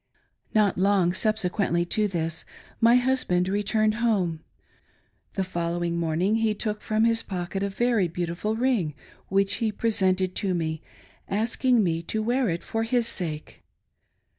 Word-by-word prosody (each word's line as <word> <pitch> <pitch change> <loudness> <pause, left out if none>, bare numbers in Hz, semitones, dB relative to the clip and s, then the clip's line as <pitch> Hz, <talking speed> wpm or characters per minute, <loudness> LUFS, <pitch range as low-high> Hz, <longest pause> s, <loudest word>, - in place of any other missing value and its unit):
Not 205 -4 +3
long 190 -2 +3
subsequently 195 -4 0
to 210 +4 +1
this, 165 -3 -3 0.4
my 235 +1 +6
husband 250 -8 +2
returned 210 +2 +1
home. 190 -9 +1 1.0
The 195 - 0
following 170 -1 -2
morning 170 +6 +1
he 225 -1 +1
took 210 0 -3
from 215 0 0
his 230 0 +3
pocket 185 0 -4
a 200 - 0
very 220 -3 +1
beauti 170 0 -3
ful 210 +5 -2
ring 225 - 0 0.3
which 195 +1 +1
he 220 -2 +1
presented 190 -4 +1
to 190 -3 0
me, 160 -2 -2 0.5
asking 230 +3 +2
me 165 -2 0
to 215 +6 -3
wear 245 +2 +1
it 170 0 -3
for 225 - -2
his 235 +1 +1
sake. 155 -8 -4
200 Hz, 145 wpm, -26 LUFS, 175-220 Hz, 1.0 s, my